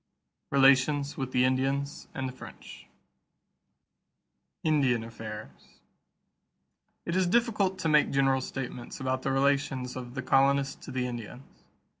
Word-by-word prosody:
RELATIONS 140 Hz, +1 st, +4 dB
WITH 130 Hz, -1 st, -4 dB
THE 125 Hz, 0 st, +3 dB
INDIANS 135 Hz, +2 st, -1 dB
AND 130 Hz, -1 st, -2 dB
THE 130 Hz, -, -6 dB
FRENCH -, -, -12 dB, 1.8 s
=Indian 135 Hz, -7 st, +2 dB
Affairs.= 110 Hz, -1 st, -10 dB, 1.3 s
It 170 Hz, -, -2 dB
is 185 Hz, -1 st, +2 dB
difficult 205 Hz, -3 st, +1 dB
to 185 Hz, -, -2 dB
make 150 Hz, -1 st, +4 dB
general 135 Hz, -1 st, +2 dB
statements 125 Hz, -2 st, -6 dB
about 130 Hz, -1 st, -1 dB
the 135 Hz, -, -1 dB
relations 135 Hz, -2 st, 0 dB
of 125 Hz, 0 st, -7 dB
the 130 Hz, -, -3 dB
colonists 135 Hz, +1 st, +2 dB
to -, -, -8 dB
the 125 Hz, -1 st, -1 dB
Indians. 120 Hz, +2 st, -8 dB
135 Hz, 125 wpm, -29 LUFS, 130-140 Hz, 1.8 s, RELATIONS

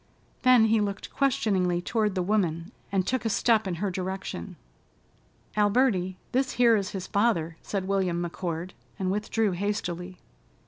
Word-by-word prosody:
Then 250 Hz, -3 st, +6 dB
he 220 Hz, 0 st, +3 dB
looked 200 Hz, -1 st, -4 dB
questioningly 195 Hz, -10 st, +1 dB
toward 210 Hz, +2 st, 0 dB
the 185 Hz, -, 0 dB
woman, 175 Hz, -3 st, 0 dB, 0.2 s
and 190 Hz, -2 st, +1 dB
took 260 Hz, +3 st, -1 dB
a 225 Hz, -, 0 dB
step 220 Hz, -1 st, +2 dB
in 180 Hz, -, -2 dB
her 195 Hz, +3 st, -2 dB
direction. 185 Hz, -, -5 dB, 1.0 s
"Alberty, 205 Hz, -3 st, +2 dB
this 260 Hz, +1 st, +1 dB
here 235 Hz, -2 st, +5 dB
is 200 Hz, -3 st, -1 dB
his 190 Hz, -3 st, -5 dB
father," 200 Hz, -7 st, +1 dB
said 195 Hz, -2 st, -3 dB
William 190 Hz, -3 st, +1 dB
McCord 175 Hz, 0 st, -4 dB, 0.3 s
and 190 Hz, -2 st, -1 dB
withdrew 210 Hz, +1 st, 0 dB
hastily. 180 Hz, -2 st, -3 dB
Mr. -, -, -24 dB
195 Hz, 150 wpm, -27 LUFS, 180-220 Hz, 1.0 s, Then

